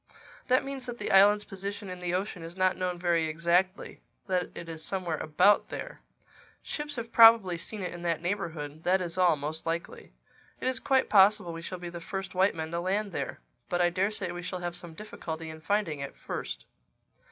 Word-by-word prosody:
"That 255 0 +4
means 270 -2 -5
that 240 -1 -5
the 210 - -3
island's 205 +2 +6
position 200 +1 -6
in 180 -1 -6
the 180 0 -1
ocean 185 -1 -3
is 165 +2 -9
not 185 0 +3
known 180 -1 -2
very 170 -2 +1
exactly—that 180 +2 -1
it 170 - -7
is 160 -1 -7
somewhere 180 -5 -2
about 180 +7 +3
there. - - -7 0.6
Ships 295 -1 -4
have 230 -1 -5
probably 225 -6 +7
seen 200 +4 -5
it 180 - -4
in 175 - -8
that 170 -2 0
neighborhood, 160 -5 -4
that 185 +2 +3
is 175 -2 -4
all, 180 -3 +5
most 150 +3 -4
likely. 165 - -4 0.5
It - - -2
is 260 - 0
quite 265 -1 +2
possible 195 -3 +5
we 165 - -6
shall 185 +2 -5
be 175 -1 -6
the 170 0 -8
first 190 +3 -5
white 190 +1 +3
men 160 0 -4
to 170 - -1
land 195 +3 -1
there. 140 -5 -4 0.3
But 175 - 0
I 175 0 +3
daresay 190 0 0
we 175 0 -6
shall 180 0 -5
have 175 0 -3
some 170 -2 -8
difficulty 160 -5 -6
in 155 0 -11
finding 195 -5 0
it 140 0 -6
first." - - -5
180 Hz, 200 wpm, -29 LUFS, 165-200 Hz, 0.6 s, probably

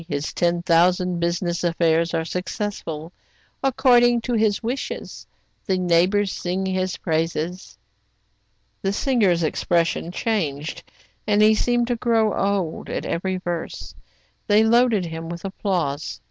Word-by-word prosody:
His 145 -1 -3
ten 175 0 0
thousand 180 +1 +3
business 170 0 -1
affairs 165 -1 +2
are 160 0 -1
successful, 180 -3 -4 0.5
according 245 -2 +4
to 245 - -3
his 215 -1 +1
wishes. 245 +4 -5 0.4
The 190 -2 +1
neighbors 185 +3 +2
sing 185 +2 -2
his 185 0 -1
praises." 165 +2 -2 1.0
The 195 -1 0
singer's 205 -8 +2
expression 170 +1 0
changed, 165 -8 -2 0.5
and 205 -1 +3
he 215 +1 +6
seemed 240 +2 +1
to 245 0 -1
grow 225 -3 +2
old, 195 -5 -1
at - - -3
every 185 +2 -2
verse. 175 -2 -5 0.5
They 210 +1 +5
loaded 230 -3 +3
him 165 0 -6
with 170 +2 -7
applause. 175 -7 -2
185 Hz, 125 wpm, -22 LUFS, 170-215 Hz, 1.0 s, he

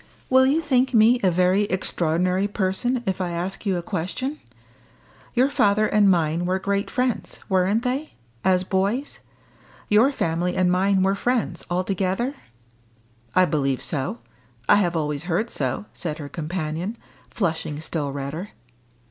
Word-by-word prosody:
"Will 260 0 +6
you 300 +5 +2
think 260 -4 +2
me 230 +3 +6
a 190 - +4
very 185 +3 +3
extraordinary 180 0 0
person 205 +5 -1
if 190 -1 -1
I 180 - -1
ask 180 +5 -4
you 190 -2 +1
a 175 - -4
question? 195 - -3 1.0
Your 255 +2 +4
father 205 -2 +3
and 210 -2 +4
mine 170 -1 +1
were 185 +1 +1
great 200 +1 -1
friends, 250 -2 -1
weren't 190 +4 +2
they, 270 +5 -2 0.3
as 185 -1 +3
boys? 200 +9 -1 0.7
your 220 +7 +5
family 175 - -1
and 180 -1 +2
mine 190 +1 +3
were 195 +1 +3
friends, 215 -4 -1
altogether?" 190 +7 -1 1.0
"I 185 - +6
believe 135 -6 0
so 135 -6 -3 0.5
I - - +6
have 175 -4 +1
always 150 -1 -2
heard 190 +7 -1
so," 130 +7 -2
said 155 -3 -4
her 145 -2 -7
companion, 165 - -4 0.3
flushing 160 -6 -2
still 155 -2 -3
redder. 140 +8 -5
185 Hz, 145 wpm, -23 LUFS, 170-215 Hz, 1.0 s, Will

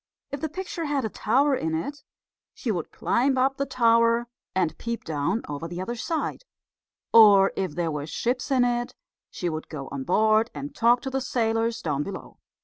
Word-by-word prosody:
If 285 0 -5
the 315 - -2
picture 360 +1 -5
had 285 -4 0
a - - -1
tower 270 +8 +2
in 160 -8 -2
it, 285 - -4 0.5
she 235 - -2
would 175 -6 -3
climb 265 +2 +1
up 270 +1 +2
the 275 - -1
tower 230 -1 +3 0.3
and 180 -4 +1
peep 235 0 -4
down 160 +8 -1
over 145 +3 -5
the 175 +1 -6
other 190 +6 -3
side; 315 +7 -3 0.7
or 205 -4 +7
if 185 -6 -2
there 170 -2 -1
were 150 -1 -4
ships 245 - -2
in 260 -3 +3
it 240 0 -1 0.3
she 175 - -4
would 155 -2 -4
go 140 -4 -6
on 135 -1 -4
board 215 - +3
and 285 0 -6
talk 240 -1 +3
to 265 - -5
the 270 0 -1
sailors 225 -2 0
down 145 -3 -1
below. 195 +6 -7
230 Hz, 190 wpm, -25 LUFS, 175-260 Hz, 0.7 s, or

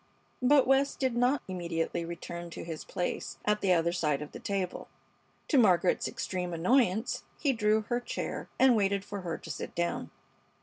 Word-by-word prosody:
But 270 +2 +5
West 270 +1 +3
did 260 -3 0
not 250 +4 +2
immediately 170 -2 -2
return 170 0 -6
to - - -7
his 165 -2 -6
place 175 - -3
at 210 0 +2
the 195 - +2
other 170 0 +2
side 150 -5 0
of 150 - -10
the - - -8
table. 195 -3 -3 0.6
To 285 - +5
Margaret's 185 -5 +4
extreme 180 -2 -3
annoyance 220 +4 +2
he 280 -3 +1
drew 215 -1 +2
her 240 +3 -1
chair 245 - -4
and 260 -2 +6
waited 200 -1 +1
for 205 -1 -5
her 170 -2 -3
to 165 - -8
sit - - -6
down. 170 0 -1
195 Hz, 175 wpm, -30 LUFS, 170-240 Hz, 0.6 s, and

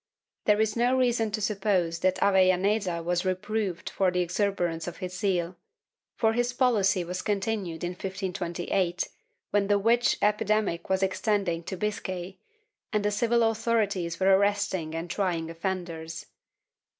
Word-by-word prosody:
There 210 0 +4
is 220 -1 +1
no 245 +2 +2
reason 240 -3 +2
to 215 +1 -3
suppose 195 -5 0
that 185 +1 +2
Avellaneda 190 -1 +3
was 175 +1 0
reproved 190 0 -2
for 190 -1 +2
the 180 0 0
exuberance 175 -2 -1
of 175 - -6
his 185 -1 -5
zeal, 180 -4 -1 0.6
for 225 -1 +2
his 245 +1 0
policy 210 -7 +2
was 180 +1 -4
continued 195 -5 -2
in 175 - -1
1528, 180 -1 -2 0.4
when 205 -1 +2
the 205 0 +4
witch 235 +4 +3
epidemic 210 -4 +1
was 190 0 +2
extending 190 -2 0
to 190 - -5
Biscay, 190 -3 -4 0.5
and 210 -1 0
the 210 - +2
civil 235 +3 +2
authorities 215 -6 0
were 190 0 +5
arresting 200 -5 0
and 165 +1 -3
trying 170 -3 -1
offenders. 165 -2 -4
195 Hz, 140 wpm, -27 LUFS, 175-210 Hz, 0.6 s, were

